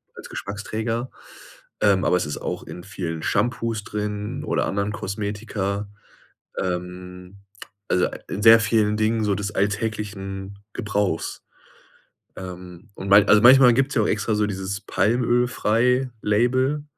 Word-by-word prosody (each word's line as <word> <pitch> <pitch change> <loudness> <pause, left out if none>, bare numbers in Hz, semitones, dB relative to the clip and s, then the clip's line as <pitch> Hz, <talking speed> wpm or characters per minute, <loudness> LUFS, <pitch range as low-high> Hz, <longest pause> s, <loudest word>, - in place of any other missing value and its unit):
als - - -11
Geschmacksträger, 110 +4 -4 0.7
ähm, 100 -2 +3
aber 90 - +3
es 90 - -1
ist 75 -1 -4
auch - - -4
in 90 - -9
vielen 85 -5 -5
Shampoos 115 -3 -1
drin 105 +5 -4
oder - - 0
anderen 100 +1 -1
Kosmetika, 100 0 -3 0.8
ähm, 90 +1 -6 0.5
also, 90 0 +2
a - - -6
in 105 - -4
sehr 115 +1 +8
vielen 105 -1 +2
Dingen 110 0 +1
so 100 -1 +1
des 105 +1 -4
alltäglichen 100 -2 -3 0.2
Gebrauchs. 100 -5 -2 0.9
Ähm, 90 +1 -9
und 95 - -6
mal 100 +1 +7
also, 105 0 +5
manchmal 125 +1 +8
gibt's 135 +3 +1
ja 110 - +3
auch - - 0
extra 105 +1 0
so 105 0 +2
dieses 95 0 -4
„Palmölfrei“ 120 +2 +1
Label. 130 +7 +1
105 Hz, 135 wpm, -23 LUFS, 95-115 Hz, 0.9 s, sehr